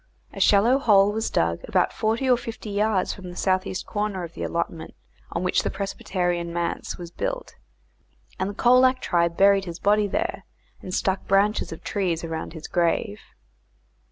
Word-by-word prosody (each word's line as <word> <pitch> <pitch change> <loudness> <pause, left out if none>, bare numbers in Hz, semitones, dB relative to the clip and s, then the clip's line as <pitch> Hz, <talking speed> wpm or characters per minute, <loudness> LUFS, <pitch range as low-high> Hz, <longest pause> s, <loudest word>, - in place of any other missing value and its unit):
A - - -8
shallow 230 +7 +4
hole 205 -5 +5
was 220 +1 -2
dug 85 0 0
about - - +2
forty 225 +4 0
or 250 - +6
fifty 230 -2 -7
yards 205 -2 +1
from 185 -2 -9
the 175 - -9
south 185 +1 +1
east 185 - -4
corner 205 -3 -2
of 170 -1 -8
the - - -8
allotment 170 -1 -3 0.4
on 170 - -2
which 180 - +2
the - - -2
Presbyterian 175 -3 -2
manse 170 0 -3
was 175 -1 -8
built, - - -4 0.9
and 190 +1 -1
the 205 - -7
Colac 255 +3 +4
tribe 170 -4 0
buried 195 0 +5
his 170 -2 -6
body 205 +1 +2
there, 335 - -2 0.4
and 185 - -7
stuck 190 0 -1
branches 200 +2 +2
of 165 - -9
trees 175 -5 -1
around 160 -1 -5
his 160 -2 -8
grave. 170 - 0
195 Hz, 175 wpm, -24 LUFS, 170-210 Hz, 0.9 s, or